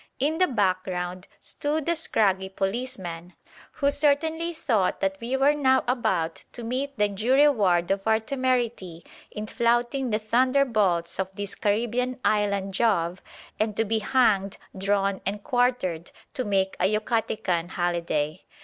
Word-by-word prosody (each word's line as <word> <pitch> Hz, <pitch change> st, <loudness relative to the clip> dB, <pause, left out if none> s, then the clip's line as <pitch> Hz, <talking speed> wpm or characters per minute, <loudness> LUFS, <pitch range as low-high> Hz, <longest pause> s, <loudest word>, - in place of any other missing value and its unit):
In 305 Hz, +5 st, 0 dB
the 370 Hz, -, +4 dB
background 185 Hz, -4 st, -1 dB
stood 295 Hz, +1 st, -3 dB
the 340 Hz, -, +1 dB
scraggy 195 Hz, -, +1 dB
policeman, 190 Hz, -4 st, -4 dB, 0.4 s
who 280 Hz, -1 st, +1 dB
certainly 320 Hz, +4 st, +1 dB
thought 225 Hz, -, 0 dB
that 195 Hz, +1 st, -1 dB
we 245 Hz, +3 st, -1 dB
were 275 Hz, +2 st, +4 dB
now 265 Hz, -3 st, +3 dB
about 170 Hz, -10 st, 0 dB
to 240 Hz, -, -6 dB
meet 265 Hz, +4 st, -3 dB
the 210 Hz, 0 st, +3 dB
due 215 Hz, +6 st, 0 dB
reward 200 Hz, -, +3 dB
of 195 Hz, +2 st, -1 dB
our 220 Hz, 0 st, +4 dB
temerity 240 Hz, -9 st, -2 dB, 0.2 s
in 210 Hz, -, -6 dB
flouting 240 Hz, +4 st, 0 dB
the 215 Hz, -, +1 dB
thunderbolts 220 Hz, -7 st, +1 dB
of 190 Hz, 0 st, -3 dB
this 200 Hz, -1 st, -3 dB
Caribbean 240 Hz, +5 st, -1 dB
island 200 Hz, -2 st, +1 dB
Jove 185 Hz, -5 st, +1 dB, 0.4 s
and 215 Hz, -1 st, -1 dB
to 225 Hz, -, +2 dB
be 220 Hz, +1 st, 0 dB
hanged, 210 Hz, -4 st, +2 dB, 0.2 s
drawn 195 Hz, 0 st, 0 dB
and 200 Hz, +1 st, -3 dB
quartered 245 Hz, -, 0 dB, 0.2 s
to 255 Hz, -, -2 dB
"make 195 Hz, -2 st, 0 dB
a 180 Hz, -, +2 dB
Yucatecan 215 Hz, -5 st, -1 dB
holiday." 170 Hz, -3 st, -1 dB
215 Hz, 140 wpm, -25 LUFS, 190-255 Hz, 0.4 s, the